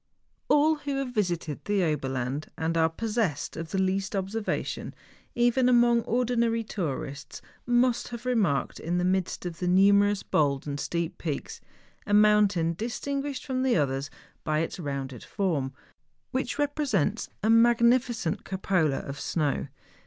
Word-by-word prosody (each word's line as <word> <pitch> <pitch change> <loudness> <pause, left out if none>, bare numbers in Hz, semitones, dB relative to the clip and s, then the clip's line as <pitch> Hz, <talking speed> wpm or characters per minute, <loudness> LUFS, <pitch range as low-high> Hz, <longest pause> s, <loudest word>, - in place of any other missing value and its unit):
All 300 +2 +4
who 285 -1 -4
have 270 -2 -3
visited 175 - -2
the 205 -2 +1
Oberland 135 -2 -2
and 165 +1 -1
are 160 0 +3
pos¬ 225 +7 -3
sessed 155 -9 -3
of 165 0 -6
the 195 - -2
least 190 +1 0
observation, 200 +3 -3 0.4
even 245 +1 +3
among 240 -1 +5
ordinary 235 -1 +1
tourists, 150 -9 -5 0.3
must 245 0 +2
have 235 0 -8
remarked, 205 - 0
in 175 +2 -2
the 180 - +1
midst 185 -1 -1
of 170 -2 -5
the 180 - -1
numerous 200 +2 +4
bold 140 -2 +1
and 145 -1 -4
steep 170 +3 -3
peaks, 150 -5 -4 0.5
a 205 - +3
mountain 205 -5 +4
dis¬ 230 +6 -4
tinguished 280 0 -3
from 260 -2 -1
the 260 -5 +2
others 140 -1 -1 0.3
by 155 0 0
its 165 - -4
rounded 135 -5 -5
form, 155 -9 -1 0.6
which 260 -1 -2
represents 275 - 0
a 220 - +3
magnificent 235 -3 +3
cupola 180 -6 0
of 140 0 -7
snow. 150 -3 -1
195 Hz, 145 wpm, -27 LUFS, 160-240 Hz, 0.6 s, among